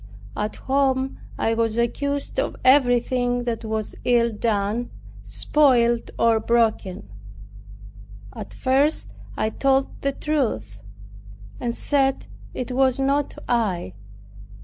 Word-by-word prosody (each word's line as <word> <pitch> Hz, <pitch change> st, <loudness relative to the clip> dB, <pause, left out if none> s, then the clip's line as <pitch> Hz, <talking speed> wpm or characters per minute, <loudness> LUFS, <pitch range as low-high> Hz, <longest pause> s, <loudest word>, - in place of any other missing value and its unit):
At 210 Hz, +1 st, -3 dB
home, 265 Hz, -1 st, 0 dB, 0.2 s
I 225 Hz, -, +1 dB
was 225 Hz, -1 st, 0 dB
accused 280 Hz, +4 st, -1 dB
of -, -, -1 dB
everything 245 Hz, -2 st, +3 dB
that 235 Hz, -1 st, -3 dB
was 220 Hz, -1 st, -3 dB
ill 235 Hz, -2 st, +3 dB
done, 215 Hz, +2 st, -1 dB, 0.3 s
spoiled 240 Hz, -6 st, +2 dB
or 230 Hz, -1 st, +3 dB
broken. 220 Hz, -, 0 dB, 1.3 s
At -, -, -7 dB
first 275 Hz, +4 st, +1 dB, 0.3 s
I 220 Hz, -, 0 dB
told 270 Hz, +1 st, 0 dB
the 275 Hz, -, +1 dB
truth, 220 Hz, -, -2 dB, 0.8 s
and 235 Hz, -1 st, -2 dB
said 270 Hz, -2 st, +1 dB, 0.3 s
it 255 Hz, 0 st, -4 dB
was 260 Hz, 0 st, +2 dB
not 275 Hz, +1 st, 0 dB
I. 195 Hz, -, 0 dB
245 Hz, 105 wpm, -23 LUFS, 225-270 Hz, 1.3 s, everything